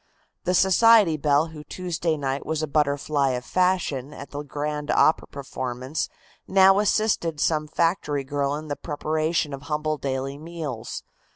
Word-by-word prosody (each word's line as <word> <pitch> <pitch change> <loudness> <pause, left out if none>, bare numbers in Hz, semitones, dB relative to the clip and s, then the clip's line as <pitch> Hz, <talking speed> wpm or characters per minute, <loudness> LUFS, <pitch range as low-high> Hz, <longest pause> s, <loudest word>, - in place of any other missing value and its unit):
The 180 0 +2
society 190 -1 +5
belle 150 +1 +2
who 155 -2 -10
Tuesday 170 0 -2
night 135 -1 -2
was 160 0 -2
a - - -1
butterfly 145 -1 +1
of 125 0 -4
fashion 180 -7 0
at 140 - -10
the 145 - -4
grand 150 +1 -4
opera 155 - +3
performance 130 0 -4 0.4
now 195 +1 +6
assisted 205 -7 +1
some 155 -1 +1
factory 160 -3 0
girl 140 +1 -1
in 155 +1 -6
the 145 - -2
preparation 155 0 -1
of 135 - -6
humble 155 0 -1
daily 135 +1 -3
meals. 155 -8 -6
150 Hz, 150 wpm, -24 LUFS, 140-165 Hz, 0.4 s, now